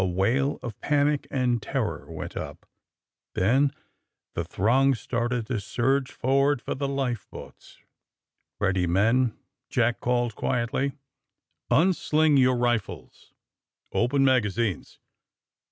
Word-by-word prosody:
A - - +2
wail 110 +10 +1
of 120 -5 -7
panic 145 0 +1
and 125 -3 0
terror - - -3
went - - -7
up. - - -7 0.7
Then 130 +9 +3 0.6
the 85 - -2
throng 130 +10 +2
started 120 0 -2
to 120 -1 -2
surge 130 +6 0
forward 135 +2 +2
for - - -4
the 140 +1 -2
life 130 -6 -2
boats. - - -12
^^ - - -37 0.7
Ready, 95 -2 +1
men," 115 +7 +2 0.3
Jack 120 0 +1
called 120 -1 0
quietly. 130 +4 -1 0.8
'^Un 185 +5 +4
sling 155 -2 +2
your 130 -1 +4
rifles. 120 -3 -3 0.6
Open 135 +4 +2
magazines. 115 - 0
125 Hz, 120 wpm, -26 LUFS, 115-135 Hz, 0.8 s, ^Un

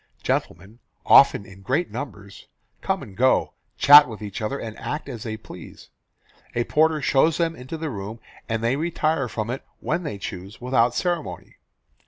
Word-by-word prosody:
Gentlemen, 105 +5 -3 0.3
often 100 - +6
in 95 0 -14
great 135 - -1
numbers, 105 -5 -8 0.3
come - - -1
and 95 - -12
go, 130 +4 +2 0.2
chat 145 +1 +9
with 110 -3 -8
each 105 +2 -6
other, 110 +6 -2
and 110 -4 -7
act 150 - -5
as 120 -5 -7
they 110 -1 -5
please. 90 -5 -12 0.7
A 120 - +1
porter 155 +2 +2
shows 145 +4 +3
them 165 -1 0
into 130 +5 -7
the 160 -2 -4
room, 105 +1 -7 0.3
and 110 0 -2
they 120 +3 +2
retire 155 -3 0
from 110 +1 -3
it 130 - -5 0.2
when 165 +4 -1
they 150 - -5
choose, 95 +2 -8
without 125 -1 +1
ceremony. 175 -3 -3
125 Hz, 170 wpm, -23 LUFS, 110-150 Hz, 0.7 s, chat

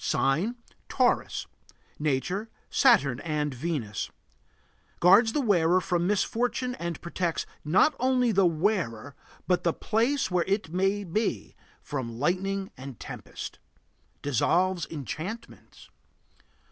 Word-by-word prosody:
Sign: 160 - +1 0.3
Taurus. - - +1 0.5
Nature: 155 +9 -1 0.2
Saturn 140 - +4
and 150 -3 -2
Venus. 130 - -3 0.9
Guards 205 +6 +6
the 295 - +1
wearer 180 -6 +3
from 175 -1 0
misfortune 245 +5 0
and 170 -2 -3
protects, 170 -1 -2 0.2
not 185 - +4
only 250 -1 +3
the 195 -3 +4
wearer 155 - -1 0.3
but 180 -1 +1
the 170 - +2
place 235 +2 0
where 180 -1 +2
it 195 -4 -1
may 195 +3 +1
be, 205 +5 -2 0.3
from 120 -5 -4
lightning 190 +7 -1
and 130 -3 -9
tempest. - - -8 0.6
Dissolves 170 +6 +1
enchantments. 165 - -7
180 Hz, 110 wpm, -27 LUFS, 150-210 Hz, 0.9 s, Guards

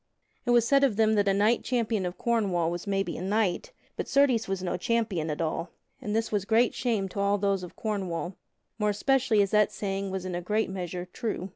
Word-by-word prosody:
It - - 0
was 240 -1 +4
said 275 +1 +4
of 260 -7 +3
them 220 0 +3
that 205 -1 +2
a 195 - +4
knight 215 +4 +2
champion 225 -6 0
of 175 - -7
Cornwall 195 -8 +1
was 175 +3 -5
maybe 195 -1 -1
a - - -6
knight, 210 - 0 0.2
but - - -4
certes 265 -5 +3
was 190 -1 -3
no 180 -1 -1
champion 185 -4 -1
at 150 +2 -3
all; 160 +2 -2 0.3
and 210 0 -3
this 225 0 0
was 205 -3 0
great 225 +4 +3
shame 225 -6 -1
to 200 - -6
all 200 +1 +2
those 200 -1 0
of 180 - -9
Cornwall, 190 -5 -3 0.5
more 210 0 +2
especially 235 0 +2
as 195 - -3
that 210 -1 +4
saying 195 -1 -3
was 190 -1 -4
in 185 - -4
a 175 - -2
great 210 +3 0
measure 180 -1 -5
true. 215 -6 -3
200 Hz, 225 wpm, -28 LUFS, 185-225 Hz, 0.5 s, was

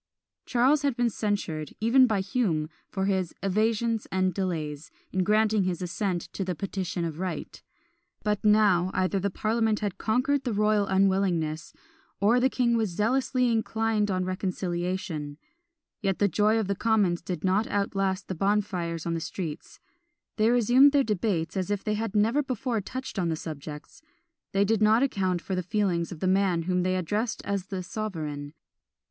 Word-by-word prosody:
Charles 260 +5 +3
has 280 -4 0
been 240 -1 +1
censured, 190 -9 -3
even 250 +4 +5
by 210 -4 +1
Hume, 190 -7 -1 0.2
for 190 -1 -2
his 190 -3 -1
"evasions 220 +3 +1
and 185 -1 +1
delays" 160 -5 -3 0.2
in 185 0 +1
granting 215 +1 +3
his 180 -2 -1
assent 180 0 -2
to 195 - -2
the 180 -1 -3
"Petition 185 0 -3
of 160 -1 -5
Right;" 185 -1 -5 0.6
but 210 -1 0
now, 210 -4 +4
either 185 +1 +1
the 200 +2 0
parliament 220 +2 0
had 205 -3 -3
conquered 255 +5 +1
the 245 - -2
royal 210 -1 +2
unwillingness, 190 -5 +1 0.5
or 220 +5 +4
the 260 +2 +3
king 240 -3 +1
was 220 -3 +1
zealously 250 +6 +1
inclined 220 -1 0
on 185 -1 0
reconciliation. 180 -4 -3 0.6
Yet 195 -3 0
the 205 - +3
joy 210 +3 +2
of 220 - 0
the 200 - +1
commons 200 -5 +1
did 175 +1 -5
not 195 +4 +2
outlast 195 -2 -1
the - - -3
bonfires 185 -3 -1
in 170 - -1
the 165 - -1
streets; 160 -1 -6 0.6
they 215 +1 +3
resumed 245 +4 +5
their 280 -1 +4
debates 185 -6 -1
as 185 -1 -2
if 205 -1 -1
they 215 - 0
had 215 0 -3
never 225 +7 +3
before 255 -4 -2
touched 255 +2 -6
on 175 -2 0
the 160 - 0
subjects: 150 - -8 0.5
they 195 +1 +2
did 220 +1 +1
not 220 +4 +5
account 185 -9 0
for 190 - -4
the 185 - 0
feelings 180 -2 0
of 165 - -8
the 185 - +1
man 185 -3 +2
whom 180 +1 0
they 185 +1 +1
addressed 210 +6 -2
as 200 -2 -2
the 190 -2 -4
sovereign. 155 -8 -5
195 Hz, 170 wpm, -27 LUFS, 180-220 Hz, 0.6 s, even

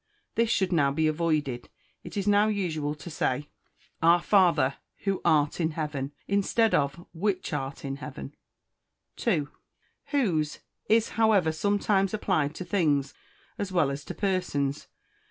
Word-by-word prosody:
_" - - -53 0.3
This 230 0 +1
should 190 -4 +1
now 145 -5 +3
be 155 +3 +1
avoided. 155 -5 0 0.3
It - - -8
is 200 0 -1
now 205 +1 +5
usual 160 -8 -1
to 150 +3 -9
say, 145 -1 -1 0.5
"Our 170 +2 +6
Father 170 -8 +3 0.3
who 195 -1 0
art 150 +2 +2
in 160 -1 0
heaven," 145 -3 -3 0.2
instead 200 +3 +2
of 140 +4 0
"which 185 0 -1
art 140 -1 -4
in 135 0 -3
heaven." 145 -1 -8 0.8
2. 165 -11 +1 0.6
Whose 175 - 0 0.3
is, 225 0 +4
however, 215 -7 +3
sometimes 200 +3 +1
applied 155 -8 0
to 185 - -6
things 145 -9 +1 0.5
as 200 -2 -3
well 160 -7 +2
as 140 +1 -5
to - - -6
persons. 180 -8 -1
165 Hz, 145 wpm, -27 LUFS, 145-200 Hz, 0.8 s, Our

